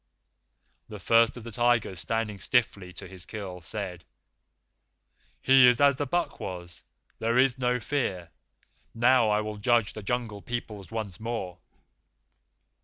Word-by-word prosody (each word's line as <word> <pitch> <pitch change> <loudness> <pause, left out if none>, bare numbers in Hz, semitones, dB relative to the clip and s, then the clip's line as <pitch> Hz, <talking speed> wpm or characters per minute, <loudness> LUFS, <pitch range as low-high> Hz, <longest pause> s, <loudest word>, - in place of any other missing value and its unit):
"The 105 - -7
First 115 +5 +3
of 120 - -9
the 115 - -8
Tigers, 115 -5 +1
standing 115 -2 -2
stiffly 100 -4 0
to - - -10
his 95 -1 -10
kill, 95 -4 -7
said. 90 -1 -6 1.4
'He 130 -1 +7
is 125 0 +4
as 140 -2 +5
the 145 - -2
buck 175 +5 -1
was. 90 -2 -7 0.4
There 115 +2 +1
is 130 -1 +3
no 125 0 +1
Fear. 100 - -2 0.6
Now 120 -1 +4
I 105 0 +2
will 105 0 -5
judge 115 0 +2
the 110 - -7
Jungle 110 -1 -3
Peoples 110 -5 -6
once 110 -5 -5
more. 110 -6 -5
110 Hz, 140 wpm, -27 LUFS, 100-120 Hz, 1.4 s, He